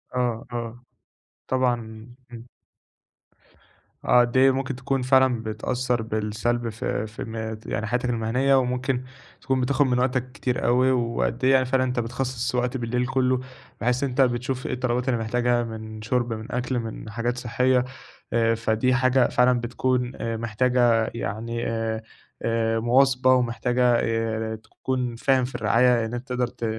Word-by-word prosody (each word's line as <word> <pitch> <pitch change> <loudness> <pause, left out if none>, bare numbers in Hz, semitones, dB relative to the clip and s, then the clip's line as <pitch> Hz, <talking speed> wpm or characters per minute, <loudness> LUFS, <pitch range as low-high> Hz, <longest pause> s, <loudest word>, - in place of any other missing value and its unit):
آه 120 -2 -1
آه، 120 0 -5 0.6
طبعًا، 130 -1 +2 0.6
امم. 115 0 -10 1.6
آه 125 - +5
قد 120 +1 0
إيه 135 +1 +6
ممكن 135 0 -2
تكون 130 +1 -1
فعلًا 130 -2 +3
بتأثَّر 120 +3 -1
بالسَّلب 110 +2 -2
في 110 -1 -3
في 110 - -7
م 115 - -7 0.4
يعني 110 - -2
حياتك 125 +2 -1
المهنيّة، 125 +4 +2
وممكن 130 0 0 0.4
تكون 130 -1 0
بتاخد 135 +3 +2
من 125 -1 +1
وقتك 125 0 0
كتير 125 -2 -2
أوي، 125 +2 +4
وقد 115 - -1
إيه 130 - +5
يعني 130 -1 +4
فعلًا 130 0 +1
أنتَ 125 -1 -1
بتخصص 125 +1 -2
وقت 125 +1 0
بالليل 125 +1 -1
كلُّه 130 -1 +1 0.4
بحيث 125 +3 +1
إن 140 - +1
أنت 130 +2 +1
بتشوف 125 +1 0
إيه - - -2
الطلبات 125 +1 -1
اللي 120 - +1
محتاجها 120 +2 +1
من 110 -1 -7
شُرب، 120 +1 0
من 110 0 -7
أكل، 125 0 -1
من 110 -1 -6
حاجات 120 +3 -2
صحية، 125 +1 +2 0.5
آآ 115 0 +3
فدي 115 +3 +1
حاجة 130 0 +3
فعلًا 125 0 +3
بتكون 125 +1 -1
آآ 115 -1 -3
محتاجة 115 0 +2
يعني 115 +2 -3
آآ، 115 -1 -2 0.8
مواظبة، 130 +2 +4
ومحتاجة 125 0 +2
آآ، 110 -1 -1
تكون 125 +2 -4
فاهم 130 +1 +2
في 125 - -8
الرعاية 120 +1 +3
إن 110 - -6
أنت 120 +2 -5
تقدر 125 -1 0
ت 120 -1 -6
125 Hz, 155 wpm, -24 LUFS, 115-130 Hz, 1.6 s, إيه